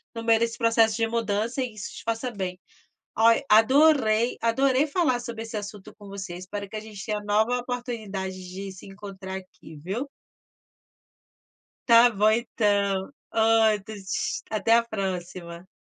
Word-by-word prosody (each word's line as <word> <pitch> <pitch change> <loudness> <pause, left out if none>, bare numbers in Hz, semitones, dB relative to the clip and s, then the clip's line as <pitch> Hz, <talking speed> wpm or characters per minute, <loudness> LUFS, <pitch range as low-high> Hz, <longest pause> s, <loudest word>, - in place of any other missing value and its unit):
no 230 - -5
meio 225 -1 +4
desse 230 0 -1
processo 230 -2 +3
de 225 -1 +1
mudança 225 +2 -1
e 250 -4 -3
isso 210 - -8
te - - -9
faça 230 +2 -2
bem. 185 -3 -5 0.6
Olha, 230 +4 +4
adorei, 240 0 +4
adorei 265 +4 +2
falar 285 -6 +1
sobre 230 -2 -6
esse 225 -1 -6
assunto 205 -1 -8
com 205 - -12
você, 195 -3 -7
espero 200 +3 -6
a 215 - -4
gente 210 -3 -9
tenha 210 -1 -2
nova 215 +4 +1
oportunidade 230 -6 -4
de 195 +1 -7
se 190 - -13
encontrar 195 -1 -8
aqui, 185 -4 -12
viu? 195 - -4 1.8
Tá 235 +1 +8
bom, 215 -1 +3
então. 205 -4 0 0.2
Outro, 220 -2 +2 0.6
até 225 +1 +3
a 235 - +2
próxima. 180 -4 -5
220 Hz, 145 wpm, -25 LUFS, 195-230 Hz, 1.8 s, Tá